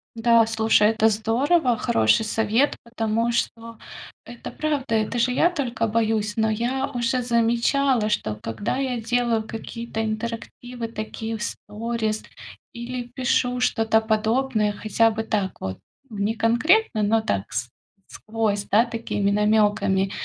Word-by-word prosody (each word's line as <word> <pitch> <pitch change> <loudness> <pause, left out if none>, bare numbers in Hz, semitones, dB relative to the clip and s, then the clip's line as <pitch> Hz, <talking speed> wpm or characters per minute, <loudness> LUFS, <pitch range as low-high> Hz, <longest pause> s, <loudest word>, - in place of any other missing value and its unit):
Да, 230 0 +4
слушай, 220 -1 +3
это 220 0 +3
здорово, 245 +6 +1
хороший 110 - +2
совет, 225 +5 +1
потому 230 0 -1
что 230 -1 -3 0.5
это 240 - -9
правда, 285 -6 -2
это 220 +2 0
же 245 +2 +2
я 335 +7 +3
только 250 -8 -2
боюсь. 220 0 0
Но 220 0 +2
я 245 +5 -1
уже 245 +1 0
замечала, 235 +1 +2
что 110 - -1
когда 115 - -4
я 255 -3 -2
делаю 235 -1 +1
какие-то 225 0 -5
интерактивы 230 +2 -5
такие 225 0 -5
в 215 - -7
сторис 220 0 -3 0.5
или 245 +1 -5
пишу 250 -1 +1
что-то 225 -2 +2
подобное 220 0 +1
хотя 215 +2 +2
бы 220 0 -3
так 205 -4 -2
вот, 95 0 -5 0.3
не 210 +2 -1
конкретно, 240 - +2
но 220 +2 +2
так 100 - -2
с 125 - -3 0.4
сквозь, 215 -2 -2
да, 225 +4 +3
такими 225 -4 -2
намёками. 205 -2 +2
225 Hz, 135 wpm, -23 LUFS, 215-240 Hz, 0.5 s, Да